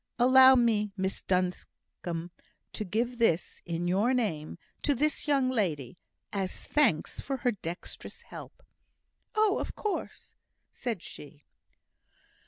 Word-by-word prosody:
"Allow 260 Hz, +1 st, +8 dB
me, 220 Hz, -4 st, +2 dB
Miss 190 Hz, 0 st, -2 dB
Duncombe, 180 Hz, -2 st, -3 dB, 0.4 s
to -, -, -3 dB
give 235 Hz, +5 st, -1 dB
this 175 Hz, -8 st, +1 dB
in 170 Hz, +1 st, -2 dB
your 205 Hz, +8 st, +2 dB
name 165 Hz, -11 st, -2 dB, 0.2 s
to 285 Hz, -, +2 dB
this 300 Hz, +4 st, 0 dB
young 270 Hz, -3 st, +3 dB
lady, 170 Hz, -, -1 dB, 0.3 s
as 195 Hz, -2 st, -2 dB
thanks 245 Hz, -, +2 dB
for 270 Hz, -1 st, -3 dB
her 245 Hz, -1 st, +1 dB
dexterous 175 Hz, -5 st, -7 dB
help." -, -, -11 dB, 0.7 s
"Oh 430 Hz, 0 st, +3 dB
of -, -, -4 dB
course," 420 Hz, -2 st, -4 dB, 0.4 s
said 230 Hz, -8 st, -4 dB
she. 145 Hz, 0 st, -11 dB
215 Hz, 120 wpm, -29 LUFS, 175-255 Hz, 0.7 s, Allow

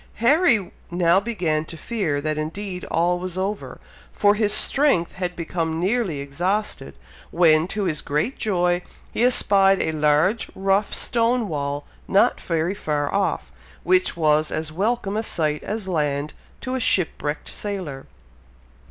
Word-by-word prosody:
Harry 235 Hz, -, +3 dB, 0.2 s
now 175 Hz, +1 st, +3 dB
began 180 Hz, -8 st, -1 dB
to 165 Hz, +1 st, -8 dB
fear 180 Hz, -9 st, -2 dB
that 155 Hz, +1 st, -2 dB
indeed 180 Hz, +4 st, -5 dB
all 175 Hz, +2 st, +1 dB
was 185 Hz, 0 st, -5 dB
over, 200 Hz, +2 st, -4 dB, 0.3 s
for 205 Hz, 0 st, +3 dB
his 210 Hz, -1 st, +1 dB
strength 270 Hz, -, +3 dB
had 180 Hz, -1 st, -4 dB
become 165 Hz, -1 st, -3 dB
nearly 190 Hz, -5 st, 0 dB
exhausted, 180 Hz, +10 st, -2 dB, 0.3 s
when, 165 Hz, -1 st, +4 dB
to 205 Hz, +2 st, -3 dB
his 160 Hz, -6 st, -1 dB
great 150 Hz, -, -1 dB
joy, 180 Hz, -4 st, 0 dB, 0.3 s
he -, -, -2 dB
espied 195 Hz, -6 st, +4 dB
a -, -, 0 dB
large, 155 Hz, +8 st, +2 dB
rough 195 Hz, +1 st, +1 dB
stone 235 Hz, -1 st, +1 dB
wall, 145 Hz, -3 st, -3 dB, 0.2 s
not 200 Hz, -, +3 dB
very 165 Hz, +2 st, -1 dB
far 150 Hz, -6 st, -2 dB
off, 195 Hz, -3 st, -1 dB, 0.3 s
which 185 Hz, 0 st, +2 dB
was 155 Hz, -1 st, +2 dB
as 155 Hz, 0 st, -3 dB
welcome 205 Hz, +3 st, -1 dB
a 220 Hz, -, 0 dB
sight 155 Hz, -8 st, -1 dB
as 210 Hz, -2 st, -4 dB
land 150 Hz, -4 st, -1 dB, 0.3 s
to 255 Hz, -, -4 dB
a 260 Hz, -, -1 dB
shipwrecked 160 Hz, -8 st, 0 dB
sailor. 180 Hz, -10 st, -5 dB
180 Hz, 145 wpm, -23 LUFS, 155-205 Hz, 0.3 s, when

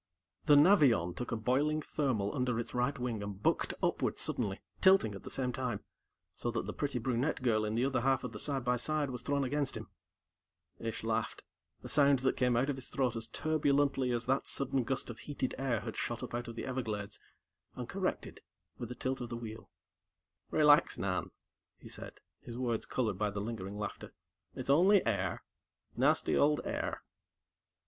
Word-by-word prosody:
The 145 Hz, -, +7 dB
Navion 145 Hz, -, +5 dB
took 125 Hz, -, -5 dB
a -, -, +1 dB
boiling 135 Hz, +7 st, +1 dB
thermal 125 Hz, -11 st, -1 dB
under 125 Hz, -3 st, 0 dB
its 120 Hz, -, -5 dB
right 125 Hz, +3 st, 0 dB
wing 120 Hz, -4 st, -2 dB
and 100 Hz, -1 st, -5 dB
bucked -, -, +1 dB
upward -, -, +1 dB
suddenly, 100 Hz, -5 st, -1 dB, 0.2 s
tilting 190 Hz, -, +5 dB
at 100 Hz, -, -8 dB
the -, -, -8 dB
same 125 Hz, -2 st, -1 dB
time, 125 Hz, -5 st, -3 dB, 0.5 s
so 120 Hz, -, -3 dB
that 120 Hz, -, -2 dB
the -, -, -4 dB
pretty 140 Hz, -3 st, -2 dB
brunette 125 Hz, +4 st, -1 dB
girl 110 Hz, -3 st, +3 dB
in 105 Hz, +1 st, -2 dB
the 120 Hz, +3 st, +2 dB
other 135 Hz, -2 st, +1 dB
half 135 Hz, 0 st, +2 dB
of 125 Hz, -, -4 dB
the -, -, -7 dB
side 135 Hz, -4 st, -2 dB
by 125 Hz, 0 st, +2 dB
side 150 Hz, +2 st, -1 dB
was 125 Hz, -2 st, -5 dB
thrown 140 Hz, +2 st, 0 dB
against 140 Hz, +1 st, -1 dB
him. -, -, -8 dB, 0.9 s
Ish 115 Hz, -1 st, -4 dB
laughed, 110 Hz, 0 st, -1 dB, 0.4 s
a -, -, -6 dB
sound 140 Hz, -1 st, +5 dB
that 130 Hz, +1 st, +1 dB
came 125 Hz, -2 st, +2 dB
out 130 Hz, +3 st, +2 dB
of 140 Hz, -2 st, -1 dB
his 130 Hz, -, -6 dB
throat 130 Hz, -4 st, 0 dB
as 115 Hz, -1 st, -4 dB
turbulently 145 Hz, -4 st, +1 dB
as 120 Hz, -1 st, -1 dB
that 135 Hz, +2 st, +1 dB
sudden 135 Hz, -1 st, +1 dB
gust 135 Hz, -1 st, -2 dB
of 115 Hz, -, -11 dB
heated 140 Hz, -3 st, -3 dB
air 125 Hz, -6 st, 0 dB
had -, -, -6 dB
shot -, -, -2 dB
up -, -, -6 dB
out 120 Hz, +1 st, -3 dB
of 115 Hz, -, -7 dB
the -, -, -4 dB
Everglades, 110 Hz, -6 st, -3 dB, 0.6 s
and -, -, -5 dB
corrected -, -, -3 dB, 0.4 s
with 120 Hz, -, -5 dB
a 125 Hz, -, -5 dB
tilt 130 Hz, +1 st, -2 dB
of 120 Hz, -, -5 dB
the 120 Hz, -, -4 dB
wheel. 110 Hz, -1 st, -8 dB, 0.8 s
"Relax, 150 Hz, +1 st, +5 dB
Nan," 95 Hz, -1 st, -1 dB, 0.5 s
he -, -, -13 dB
said, -, -, -7 dB, 0.3 s
his 120 Hz, -, -8 dB
words 120 Hz, -3 st, -1 dB
colored 110 Hz, -7 st, -1 dB
by 105 Hz, -1 st, +1 dB
the 100 Hz, 0 st, -4 dB
lingering 100 Hz, -2 st, -5 dB
laughter. 105 Hz, -1 st, -5 dB, 0.4 s
"It's 130 Hz, 0 st, -1 dB
only 185 Hz, +7 st, +5 dB
air; 100 Hz, -5 st, -1 dB, 0.5 s
nasty -, -, +3 dB
old 150 Hz, +1 st, +4 dB
air." -, -, -3 dB
125 Hz, 190 wpm, -33 LUFS, 115-140 Hz, 0.9 s, The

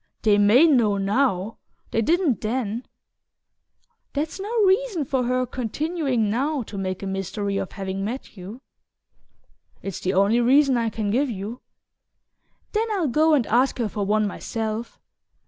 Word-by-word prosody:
"They 205 Hz, -2 st, +4 dB
may 215 Hz, +9 st, +6 dB
know 235 Hz, -10 st, +3 dB
NOW; 205 Hz, 0 st, 0 dB, 0.3 s
they 225 Hz, -, +1 dB
didn't 325 Hz, -, +1 dB
then 230 Hz, +1 st, -2 dB, 0.6 s
" -, -, -49 dB
"That's 305 Hz, +6 st, -3 dB
no 405 Hz, +3 st, -5 dB
reason 385 Hz, -, +2 dB
for 260 Hz, -1 st, 0 dB
her 255 Hz, +1 st, +1 dB
continuing 260 Hz, 0 st, -1 dB
now 265 Hz, +6 st, 0 dB
to 215 Hz, -, -11 dB
make 185 Hz, 0 st, -3 dB
a -, -, -3 dB
mystery 195 Hz, +1 st, -3 dB
of 190 Hz, -, -4 dB
having 195 Hz, 0 st, -4 dB
met 235 Hz, +5 st, -5 dB
you." 200 Hz, +6 st, -9 dB, 1.2 s
"It's 195 Hz, -3 st, -5 dB
the 185 Hz, +1 st, -1 dB
only 200 Hz, +5 st, +4 dB
reason 270 Hz, +2 st, +4 dB
I 230 Hz, -1 st, +1 dB
can 215 Hz, -1 st, -2 dB
give 270 Hz, +5 st, +1 dB
you." 215 Hz, +3 st, -6 dB, 1.1 s
"Then 445 Hz, +1 st, 0 dB
I'll 355 Hz, -8 st, 0 dB
go 310 Hz, +4 st, +4 dB
and 260 Hz, -6 st, +1 dB
ask 250 Hz, +5 st, +2 dB
her 235 Hz, -3 st, 0 dB
for 205 Hz, 0 st, -3 dB
one 210 Hz, +2 st, +2 dB
myself." 220 Hz, +2 st, -4 dB
230 Hz, 155 wpm, -24 LUFS, 205-275 Hz, 1.2 s, may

